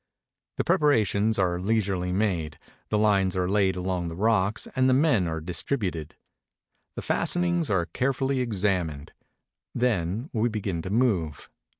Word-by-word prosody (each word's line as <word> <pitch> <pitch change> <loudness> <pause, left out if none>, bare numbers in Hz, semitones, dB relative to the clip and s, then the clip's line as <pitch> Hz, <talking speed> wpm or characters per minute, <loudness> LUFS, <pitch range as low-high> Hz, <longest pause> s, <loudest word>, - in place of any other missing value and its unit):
The - - +1
preparations 110 -7 +2
are 90 -2 +1
leisurely 95 -3 0
made, 90 -6 -1 0.3
the 105 - +1
Hnes 100 -3 +2
are 90 -1 0
laid 95 -1 +2
along 90 -1 -2
the 80 - -6
rocks 105 +1 +1
and 130 0 +3
the 130 - +4
men 130 - +3
are 80 0 -3
distributed. 85 - -3 0.8
The - - -5
fas - - +1
tenings 175 -2 0
are 95 -5 +1
carefully 135 +5 -1
examined. 95 - -1 0.6
Then 115 - -1
we 115 0 +1
begin 100 -6 -3
to 95 - -6
move. 100 - 0
100 Hz, 140 wpm, -26 LUFS, 90-115 Hz, 0.8 s, the